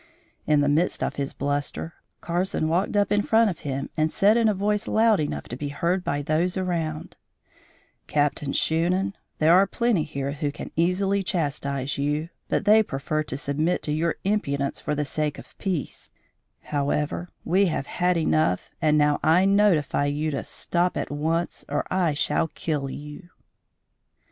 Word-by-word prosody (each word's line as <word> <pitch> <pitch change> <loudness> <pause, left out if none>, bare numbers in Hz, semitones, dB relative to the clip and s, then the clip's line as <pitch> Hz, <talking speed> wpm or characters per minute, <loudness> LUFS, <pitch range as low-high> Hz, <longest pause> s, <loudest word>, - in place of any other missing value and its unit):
In 150 -1 +4
the 145 - +2
midst 155 +5 +1
of - - -2
his 140 -1 -2
bluster, 145 +3 -2 0.3
Carson 175 -1 -1
walked 180 +5 +1
up 205 -1 +2
in 205 0 +3
front 220 0 +3
of 170 - -9
him 135 -1 -3
and 155 0 +1
said 205 +3 +4
in 230 -2 +4
a - - +2
voice 210 +2 0
loud 220 -1 +4
enough 150 - -2
to 120 - -4
be 145 +3 -4
heard 170 +6 -1
by 145 -3 -1
those 170 +5 0
around: 165 -4 -3 0.9
"Captain 145 -1 0
Shunan, 180 +7 +1 0.2
there 160 +2 +5
are 190 +2 +6
plenty 235 -4 +1
here 140 -2 -3
who 145 0 -2
can - - -8
easily 190 +4 +1
chastise 140 -6 -2
you, 150 +3 -1 0.2
but - - 0
they 215 +1 +7
prefer 155 -4 -2
to 140 -3 -4
submit 150 +5 -1
to 150 - -2
your 160 +2 0
impudence 140 -9 -1
for 150 - -2
the 150 0 -1
sake 150 +1 -2
of - - -13
peace: 180 -8 -3 0.5
however, 150 +4 -1 0.2
we 190 +4 +3
have 155 -5 -2
had 180 +3 0
enough 155 - +1
and 155 -1 +3
now 150 -1 +3
I 175 +4 +4
notify 195 -8 +3
you 150 +2 -1
to 140 - -3
stop 175 +1 -1
at - - -3
once 160 +4 -1
or 145 +1 -1
I 175 -5 +1
shall 160 +2 +1
kill 150 -3 -3
you!" 150 +5 -9
155 Hz, 170 wpm, -25 LUFS, 145-185 Hz, 0.9 s, they